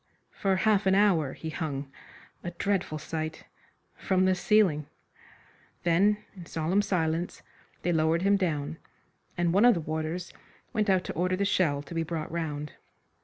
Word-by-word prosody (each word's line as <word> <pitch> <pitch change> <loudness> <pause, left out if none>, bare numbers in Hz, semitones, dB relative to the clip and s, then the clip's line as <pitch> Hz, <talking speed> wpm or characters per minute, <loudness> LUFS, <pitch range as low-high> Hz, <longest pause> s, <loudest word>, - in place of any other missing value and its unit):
For 195 -2 0
half 205 0 +2
an 190 - +5
hour 180 -9 +3
he 160 - -6
hung 140 -4 -4 0.5
a 175 - -3
dreadful 180 -2 -1
sight 155 +1 -5 0.5
from 185 -1 +1
the 185 - +4
ceiling. 180 -6 +3 1.0
Then 190 +5 +4 0.2
in 175 -3 -10
solemn 165 +5 +1
silence 170 -3 -1 0.4
they 175 - +1
lowered 160 +2 +2
him 200 +1 +4
down, 160 -5 -1 0.6
and 170 -1 +1
one 200 +4 +4
of 245 -2 +7
the - - -1
warders 160 +3 -4 0.4
went 215 -3 +1
out 185 -2 +3
to - - -5
order 180 +2 0
the 200 +2 0
shell 150 -8 +1
to 145 - -10
be 165 - 0
brought 160 -1 -4
round. 150 -3 -3
170 Hz, 160 wpm, -28 LUFS, 155-190 Hz, 1.0 s, of